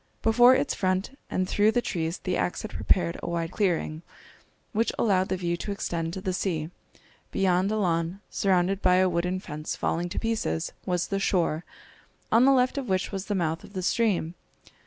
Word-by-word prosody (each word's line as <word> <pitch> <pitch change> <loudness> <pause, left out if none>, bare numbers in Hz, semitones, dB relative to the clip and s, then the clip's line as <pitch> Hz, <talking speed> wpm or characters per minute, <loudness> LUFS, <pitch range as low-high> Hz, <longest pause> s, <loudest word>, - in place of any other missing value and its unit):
Before 240 +3 +6
its 270 - 0
front 185 +7 -1
and 185 0 0
through 210 +3 +3
the 245 - +3
trees 165 -1 -2
the 185 -1 -2
axe 180 - -1
had 215 - -6
prepared 170 -2 +1
a - - -4
wide 170 -1 -2
clearing, 170 -6 0 0.7
which 225 +2 +1
allowed 190 -4 +2
the 190 - 0
view 175 -1 -1
to 205 - -4
extend 165 -4 -2
to 190 - -5
the 185 0 -2
sea. 165 -4 -2 0.6
Beyond 190 +1 +2
a 215 - 0
lawn, 170 -1 0
surrounded 190 0 +1
by 180 - +4
a 185 0 +4
wooden 180 +1 0
fence 155 -3 -5
falling 175 +2 -1
to - - -7
pieces, 220 - -1 0.2
was 180 -1 0
the 195 - 0
shore, 175 -4 0 0.7
on 235 +3 +6
the 275 - +6
left 255 +1 +3
of 255 -5 -6
which 185 0 0
was 195 -1 -4
the 205 - -1
mouth 165 -3 -1
of - - -13
the 185 -2 -3
stream. 190 -5 +1
185 Hz, 195 wpm, -27 LUFS, 170-205 Hz, 0.7 s, Before